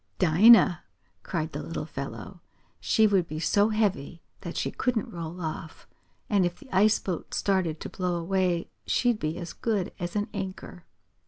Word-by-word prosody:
"Dinah!" 185 Hz, +1 st, +6 dB, 0.4 s
cried 160 Hz, -3 st, -3 dB
the -, -, -5 dB
little -, -, -5 dB
fellow. -, -, -7 dB, 0.4 s
"She 220 Hz, -, +3 dB
would 195 Hz, -5 st, +2 dB
be 155 Hz, -, -5 dB
so 205 Hz, +6 st, +3 dB
heavy 195 Hz, -7 st, -1 dB, 0.2 s
that 170 Hz, -3 st, -7 dB
she -, -, -1 dB
couldn't 235 Hz, -3 st, -2 dB
roll 170 Hz, +1 st, -6 dB
off, 160 Hz, -1 st, -6 dB, 0.4 s
and 200 Hz, -3 st, +2 dB
if 175 Hz, 0 st, -1 dB
the 265 Hz, -9 st, -9 dB
ice 210 Hz, +3 st, +5 dB
boat 180 Hz, -4 st, -5 dB
started 185 Hz, -5 st, 0 dB
to -, -, -4 dB
blow 180 Hz, -1 st, -2 dB
away 175 Hz, 0 st, 0 dB, 0.2 s
she'd 240 Hz, -3 st, +2 dB
be 155 Hz, +2 st, -2 dB
as 175 Hz, -2 st, -6 dB
good 210 Hz, -6 st, -1 dB
as 175 Hz, +2 st, -4 dB
an 205 Hz, +1 st, 0 dB
anchor." 190 Hz, -3 st, -6 dB
185 Hz, 165 wpm, -27 LUFS, 170-205 Hz, 0.4 s, Dinah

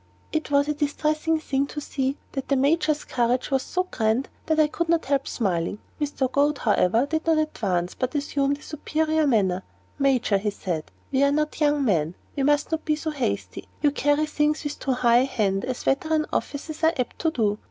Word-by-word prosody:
It 315 Hz, -1 st, -2 dB
was 285 Hz, 0 st, +3 dB
a 300 Hz, -, +1 dB
distressing 305 Hz, +2 st, 0 dB
thing 280 Hz, -2 st, -1 dB
to 295 Hz, -, -6 dB
see, 275 Hz, -1 st, -2 dB, 0.2 s
and 270 Hz, -, -2 dB
the 275 Hz, -, +2 dB
Major's 305 Hz, +2 st, +2 dB
courage 245 Hz, +2 st, 0 dB
was 270 Hz, -1 st, +2 dB
so 365 Hz, -, -1 dB
grand 235 Hz, -6 st, 0 dB, 0.2 s
that 315 Hz, -1 st, +2 dB
I 310 Hz, -, +6 dB
could 330 Hz, +2 st, -2 dB
not 335 Hz, -1 st, +2 dB
help 275 Hz, 0 st, 0 dB
smiling. 185 Hz, -4 st, -1 dB, 0.2 s
Mr. 280 Hz, -3 st, -1 dB
Goad, 290 Hz, +1 st, +2 dB
however, 225 Hz, +1 st, +2 dB
did 315 Hz, +2 st, -2 dB
not 325 Hz, -1 st, +4 dB
advance, 190 Hz, -, -1 dB
but 255 Hz, +2 st, -3 dB
assumed 285 Hz, -1 st, 0 dB
a 295 Hz, -, -17 dB
superior 310 Hz, 0 st, 0 dB
manner. 190 Hz, -7 st, +2 dB, 0.4 s
"Major," 255 Hz, -7 st, +2 dB
he 210 Hz, +2 st, -1 dB
said, 175 Hz, -6 st, -3 dB, 0.3 s
"we 270 Hz, 0 st, +2 dB
are 280 Hz, 0 st, +4 dB
not 305 Hz, +2 st, -1 dB
young 290 Hz, -2 st, +3 dB
men; 165 Hz, -6 st, +1 dB, 0.2 s
we 280 Hz, -, -1 dB
must 290 Hz, +2 st, +2 dB
not 320 Hz, 0 st, -1 dB
be 305 Hz, -, +1 dB
so 310 Hz, +1 st, -3 dB
hasty. 275 Hz, -5 st, -3 dB, 0.2 s
You 290 Hz, -, +5 dB
carry 290 Hz, +1 st, +2 dB
things 300 Hz, 0 st, 0 dB
with 295 Hz, 0 st, -4 dB
too 270 Hz, -, 0 dB
high 240 Hz, -1 st, +4 dB
a 255 Hz, -, +3 dB
hand, 200 Hz, -7 st, 0 dB
as 255 Hz, -1 st, -4 dB
veteran 310 Hz, +3 st, +1 dB
officers 310 Hz, +2 st, -3 dB
are 320 Hz, +1 st, +5 dB
apt 250 Hz, -2 st, -3 dB
to 325 Hz, -, +2 dB
do. 215 Hz, -7 st, 0 dB
280 Hz, 205 wpm, -25 LUFS, 245-305 Hz, 0.4 s, I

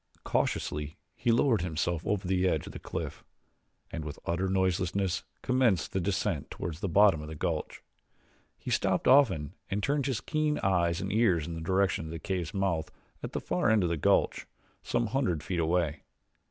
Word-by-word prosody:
Cautiously 75 Hz, 0 st, -1 dB, 0.2 s
he 120 Hz, -, +1 dB
lowered 115 Hz, -, +3 dB
himself 85 Hz, -1 st, -1 dB
over 100 Hz, -3 st, 0 dB
the 95 Hz, 0 st, +2 dB
edge 80 Hz, -4 st, 0 dB
of -, -, -9 dB
the -, -, -7 dB
cliff, -, -, -5 dB, 0.7 s
and 80 Hz, -, -4 dB
with 75 Hz, -1 st, -6 dB
utter 85 Hz, +3 st, 0 dB
noiselessness 95 Hz, 0 st, 0 dB, 0.2 s
commenced 125 Hz, -7 st, +2 dB
the 95 Hz, -, 0 dB
descent 95 Hz, +2 st, -1 dB
toward 85 Hz, -, -4 dB
the 95 Hz, -, -3 dB
bottom 95 Hz, -3 st, +5 dB
of 75 Hz, -, -7 dB
the 80 Hz, -, -7 dB
gulch. -, -, -3 dB, 0.7 s
He -, -, -6 dB
stopped -, -, +1 dB
often 95 Hz, -, +4 dB, 0.2 s
and 100 Hz, +1 st, -2 dB
turned 140 Hz, +2 st, +1 dB
his 130 Hz, -5 st, 0 dB
keen 155 Hz, -1 st, 0 dB
eyes 85 Hz, -2 st, +2 dB
and -, -, -3 dB
ears 95 Hz, -9 st, +3 dB
in 85 Hz, -, -5 dB
the 80 Hz, -, -5 dB
direction 95 Hz, 0 st, +1 dB
of 80 Hz, -, -7 dB
the 85 Hz, -, -4 dB
cave's 90 Hz, -3 st, -3 dB
mouth 90 Hz, -5 st, -1 dB, 0.3 s
at -, -, -6 dB
the -, -, -1 dB
far -, -, 0 dB
end 110 Hz, -3 st, +4 dB
of 85 Hz, -, +1 dB
the 85 Hz, -, 0 dB
gulch, 75 Hz, -, +2 dB, 0.3 s
some 120 Hz, -, 0 dB
hundred 105 Hz, -, 0 dB
feet 90 Hz, +1 st, -2 dB
away. 80 Hz, -2 st, 0 dB
90 Hz, 185 wpm, -29 LUFS, 80-105 Hz, 0.7 s, bottom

